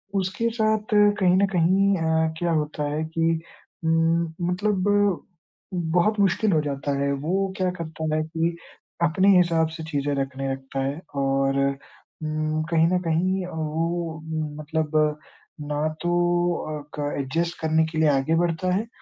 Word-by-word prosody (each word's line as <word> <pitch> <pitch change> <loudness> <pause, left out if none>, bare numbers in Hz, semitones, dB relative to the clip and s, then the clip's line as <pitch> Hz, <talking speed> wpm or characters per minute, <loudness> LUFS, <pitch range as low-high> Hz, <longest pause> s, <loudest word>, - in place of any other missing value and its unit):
उसके 195 +4 0
साथ 215 0 +1 0.3
कहीं 180 -2 +4
न 200 - +4
कहीं 190 +4 +3
अ, 160 -1 +1
क्या 175 -1 0
होता 150 -1 -1
है 155 +2 -1
कि 165 0 +2 0.4
उम, 165 0 +2 0.2
मतलब 190 +1 0 1.1
बहुत 210 +5 +2
मुश्किल 200 +2 +2
हो 155 - +3
जाता 145 -1 -3
है। 140 0 +1
वो 190 +3 0
क्या 185 -1 +1
करता 160 -1 -3
है 155 - +1
कि 165 +1 -1 0.5
अपने 190 +5 +4
हिसाब 165 -2 +3
से 160 - -6
चीज़ें 145 -1 0
रखने 135 0 -3
लगता 135 0 -4
है 140 +4 -3
और 135 0 +1 0.7
उम, 155 0 -1
कहीं 165 0 +4
न 180 +1 +2
कहीं 185 +3 +1
अ, - - -7
वो 160 +1 -2 0.4
मतलब 155 0 -1 0.6
ना 150 +1 -1
तो 175 0 0 0.7
अ, - - -9 0.2
क 145 0 -1
एडजस्ट 165 +5 -2
करने 160 0 +2
के 160 0 -6
लिए 155 -1 +4
आगे 140 +3 +2
बढ़ता 170 +1 0
है 215 +4 -1
160 Hz, 150 wpm, -24 LUFS, 155-180 Hz, 1.1 s, कहीं